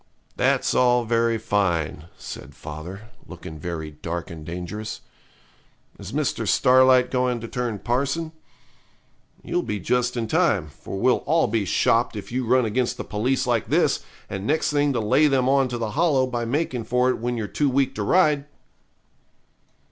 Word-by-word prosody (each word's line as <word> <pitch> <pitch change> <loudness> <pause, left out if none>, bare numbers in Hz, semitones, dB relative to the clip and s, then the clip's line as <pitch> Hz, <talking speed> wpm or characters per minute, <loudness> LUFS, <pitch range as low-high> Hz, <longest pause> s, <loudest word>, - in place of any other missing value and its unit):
'That's - - +1
all 125 -1 +3
very 115 0 +1
fine,' 85 -8 -1
said - - -9
father, 90 +9 -9 0.2
looking 80 -1 -9
very 80 -1 -5
dark 85 +3 -5
and 80 -2 -8
dangerous. 90 +6 -6 1.0
'Is - - -8
Mr. - - -1
Starlight 130 0 +5
going 125 -2 0
to 115 - -7
turn 120 -3 -3
parson? 140 +9 -1 1.1
You'll - - -1
be 105 -1 -3
just 125 +5 0
in 115 - -1
time, 110 - +1
for 75 +6 -8
we'll 125 +6 +2
all 160 +3 +3
be 105 -1 0
shopped 115 +6 +2
if 105 - -7
you 125 -1 -2
run 125 +1 +4
against 120 +3 -1
the - - -4
police 120 +6 -1
like 120 -3 0
this, - - +2 0.3
and 95 +2 -5
next 155 +1 +1
thing 145 -1 +2
to 120 - 0
lay 115 +8 +3
them 130 -3 +2
on 135 0 +3
to 120 -1 -4
the 115 -2 -3
Hollow 145 -3 +2
by 120 -2 -3
making 125 -2 -2
for 125 +2 +2
it - - -4
when 120 +1 -2
you're 110 - -2
too 145 +7 0
weak 135 +1 +1
to 105 - -4
ride.' 150 - +3
120 Hz, 170 wpm, -24 LUFS, 105-130 Hz, 1.1 s, Starlight